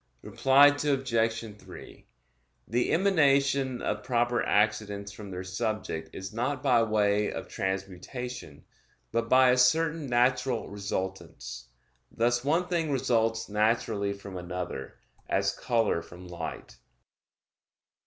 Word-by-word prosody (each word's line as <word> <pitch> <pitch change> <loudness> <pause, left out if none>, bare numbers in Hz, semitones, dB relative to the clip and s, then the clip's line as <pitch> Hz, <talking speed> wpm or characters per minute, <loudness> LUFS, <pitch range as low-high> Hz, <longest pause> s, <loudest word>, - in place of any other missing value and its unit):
Reply 140 +2 +5
Obj. 115 -6 0
3: - - -13 0.6
The 120 +2 0
emanation 140 -8 +2
of - - -1
proper 120 -1 +1
accidents 105 -1 0
from 105 0 -10
their 90 -1 -5
subject 95 -5 -3
is 95 +2 -7
not 125 +4 -2
by 125 -4 +4
way 105 -2 +2
of - - -6
transmutation, 95 - -5 0.5
but 115 0 -1
by 130 -1 +6
a 125 - +3
certain 155 +4 +2
natural 125 0 +1
resultance; 85 -11 -5 0.4
thus 120 +1 0
one 165 +6 +1
thing 170 -3 -1
results 115 -4 +1
naturally 105 -1 0
from 100 -1 -9
another, 90 -5 -6 0.3
as 100 0 +1
color 115 -8 +1
from 90 +2 -12
light. 85 -1 -7
115 Hz, 115 wpm, -28 LUFS, 100-130 Hz, 0.6 s, by